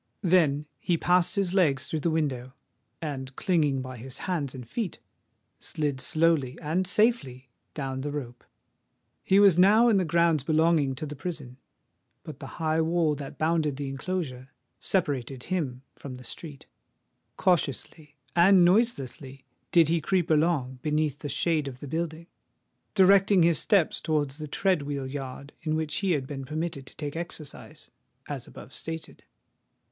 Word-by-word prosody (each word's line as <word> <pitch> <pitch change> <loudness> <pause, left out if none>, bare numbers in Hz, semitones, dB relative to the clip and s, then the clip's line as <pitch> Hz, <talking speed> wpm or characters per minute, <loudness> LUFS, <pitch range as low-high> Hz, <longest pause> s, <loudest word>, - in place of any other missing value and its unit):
Then 160 -5 +3
he 175 - 0
passed 180 +1 +2
his 195 -3 0
legs 145 -8 +3
through 160 - -2
the 170 - 0
window; 135 -6 -1 0.5
and 135 -3 -5
clinging 150 -7 +1
by 130 -1 -7
his 130 +3 -8
hands 150 -8 -2
and 125 -3 -8
feet, 210 - -3 0.6
slid 145 -4 -2
slowly 155 -2 +1
and 170 +4 -1
safely 160 - +1 0.2
down 135 -3 -3
the 145 - -3
rope. 125 -5 -6 0.8
He 195 - +4
was 195 -4 +6
now 215 +6 +6
in 215 - +4
the 190 - +2
grounds 170 -3 +2
belonging 155 -2 +2
to 145 - -5
the 150 0 -6
prison; 145 -5 -6 0.7
but - - -9
the - - -7
high 160 0 +1
wall, 165 -1 +2
that 140 -1 -7
bounded 155 -3 +1
the 140 0 -4
enclosure, 135 -3 -4 0.3
separated 135 -8 -1
him 140 -9 -3
from 135 -3 -8
the 125 - -11
street. 145 +2 -8 0.7
Cautiously 150 -3 -1 0.2
and 180 +1 +6
noiselessly 140 - 0 0.3
did 170 -3 +6
he 165 0 +2
creep 180 0 0
along, 150 -5 +1
beneath 150 -1 0
the 145 - -5
shade 155 -1 0
of 130 -2 -7
the 145 - -8
building—directing 180 +4 +1
his 165 -2 +4
steps 195 -7 +2
towards 150 -2 -1
the 155 - -5
tread 185 +2 +1
wheel 140 -1 -4
yard 135 +1 -7
in 155 -1 -1
which 155 -1 -2
he 195 -3 +1
had 140 -4 -1
been 135 0 -6
permitted 155 -1 -4
to - - -10
take 145 -1 -5
exercise, 165 -3 -7 0.4
as - - -6
above - - -12
stated. 165 0 -7
155 Hz, 155 wpm, -27 LUFS, 135-170 Hz, 0.8 s, was